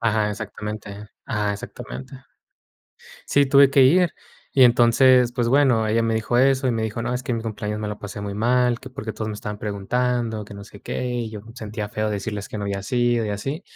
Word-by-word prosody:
Ajá, 110 -2 +1
exactamente. 105 0 -7 0.2
Ajá, 105 -1 -1
exactamente. 100 - -8 1.1
Sí, 140 -1 +4
tuve 140 0 +6
que 135 0 +5
ir. 175 +4 +4 0.4
Y 130 - +6
entonces, 125 +1 +5
pues 120 -1 0
bueno, 130 -4 +3
ella 115 +2 +2
me 115 0 0
dijo 110 +2 0
eso, 135 +1 +3
y 125 - +2
me 115 -1 -1
dijo: 110 +1 -3
"No, 125 - -2
es 125 - -3
que 125 - -3
mi 115 -1 -2
cumpleaños 105 -1 -4
me 105 - -3
lo 105 0 -5
pasé 105 0 -7
muy 100 -1 -5
mal, 120 +2 +2
que - - -10
porque 120 -4 -6
todos 110 -1 -4
me 105 - -4
estaban 105 0 -6
preguntando, 110 +2 -1
que 105 - -11
no 100 0 -9
sé 100 0 -14
qué. - - -4
Y 120 -2 -3
yo 105 -2 -7
sentía 110 -3 -5
feo 110 +1 -2
decirles 105 0 -4
que - - -6
no 100 - -3
habías 100 0 -4
ido 120 -2 +2
y - - -3
así". 135 - -4
110 Hz, 220 wpm, -23 LUFS, 105-125 Hz, 1.1 s, tuve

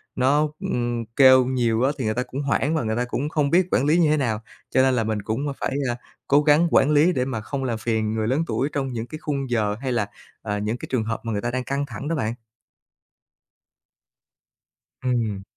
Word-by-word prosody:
nó, 140 +4 +3 0.2
ừm, 120 -1 -1
kêu 130 -2 +7
nhiều 120 -3 +1
á 135 - +3
thì 130 - -3
người 110 - +1
ta 125 +3 -1
cũng 130 +2 -5
hoảng 140 +2 0
và 160 - 0
người 110 -1 -1
ta 120 +1 0
cũng 135 +4 -3
không 150 -3 +1
biết 175 +3 +3
quản 130 - +2
lý 155 +3 +4
như 165 -3 +4
thế 155 - +3
nào, 115 -6 -1 0.3
cho 130 - +4
nên 130 0 +3
là 120 -3 +1
mình 110 -1 -2
cũng 110 +3 -3 0.2
phải, - - -2
a, 120 - -1 0.3
cố 145 +1 +5
gắng 150 +3 +4
quản 140 - +4
lý 150 +4 +5
để 125 -4 0
mà 125 -5 -3
không 135 +4 -4
làm 120 -3 -1
phiền 110 -1 -1
người 110 -1 -1
lớn 135 +7 +1
tuổi 140 - -1
trong 135 -2 -2
những 115 0 -4
cái 155 - -8
khung 140 -4 -3
giờ 105 -4 0
hay 130 -2 -2
là, 115 -4 0 0.4
à, 105 -1 -2
những 105 +3 -2
cái - - -8
trường 125 -4 +1
hợp 110 0 -3
mà 115 - -3
người 100 -1 -2
ta 120 - -2
đang 130 +1 -2
căng 140 +2 -2
thẳng 140 0 -7
đó 165 - 0
bạn. 115 -6 -1 2.7
Ừm. 115 -6 -1
125 Hz, 235 wpm, -23 LUFS, 115-140 Hz, 2.7 s, kêu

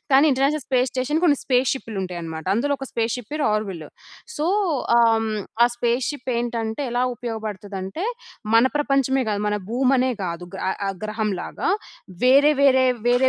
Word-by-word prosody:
కానీ 275 +3 +7
international 275 +2 +1
space 255 0 +2
station 275 +5 0
కొన్ని 290 -4 +4
space 255 0 +2
షిప్‌లు 225 -6 -6
ఉంటాయనమాట. 165 -3 -6
అందులో 285 +6 0
ఒక 270 - -6
స్పేస్‌షిప్ 230 0 -2
పేరు 305 -1 -1
ఆర్విల్. 195 -7 -3 0.5
సో, 305 +2 -1 0.5
ఆం 225 -1 +4 0.4
ఆ - - +8
స్పేస్‌షిప్ 245 +3 -1
ఏంటంటే 235 +1 -2
ఎలా 245 +1 0
ఉపయోగపడతదంటే, 215 - -5 0.5
మన 230 +2 +6
ప్రపంచమే 270 -2 +1
గాదు 205 -1 -1
మన 210 - 0
భూమి 255 +3 +2
అనే 255 +1 +2
గాదు 175 0 -5
గ - - -5
ఆహ్, - - -2
ఆ - - 0
గ్రహం 215 0 -2
లాగా - - -4 0.6
వేరే, 280 +4 +6
వేరే, 260 -2 +5 0.2
వేరే 250 +2 +4
245 Hz, 160 wpm, -23 LUFS, 215-270 Hz, 0.6 s, ఆ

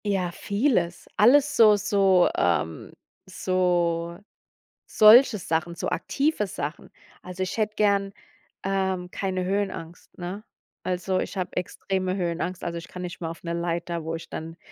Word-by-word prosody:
Ja, 190 -4 0
vieles. 200 - -1
Alles 280 +6 +5
so 215 -2 +7
so, 195 -3 +3
ähm, 85 -2 0 0.4
so 175 -2 0 0.7
solche 220 +2 +7
Sachen, 165 -1 -2
so - - -3
aktive 280 -7 0
Sachen. 150 -3 -6 0.3
Also, 180 +1 -5
ich 185 - -4
hätte 215 -1 -1
gern, 200 -1 +2 0.5
ähm, 190 -2 -1
keine 185 -2 -2
Höhenangst, 185 -3 -4
ne? 185 +4 -6 0.4
Also, 185 +1 -1
ich - - -4
habe 185 -1 -3
extreme 185 +1 -2
Höhenangst. 175 -1 -3
Also, 170 0 -3
ich 165 - -11
kann 180 - -8
nicht 175 0 -7
mal 165 - -3
auf 165 - -9
'ne 170 -1 -3
Leiter, 170 0 -2
wo 160 +1 -3
ich 165 - -8
dann 165 +1 -7
185 Hz, 145 wpm, -25 LUFS, 170-200 Hz, 0.7 s, so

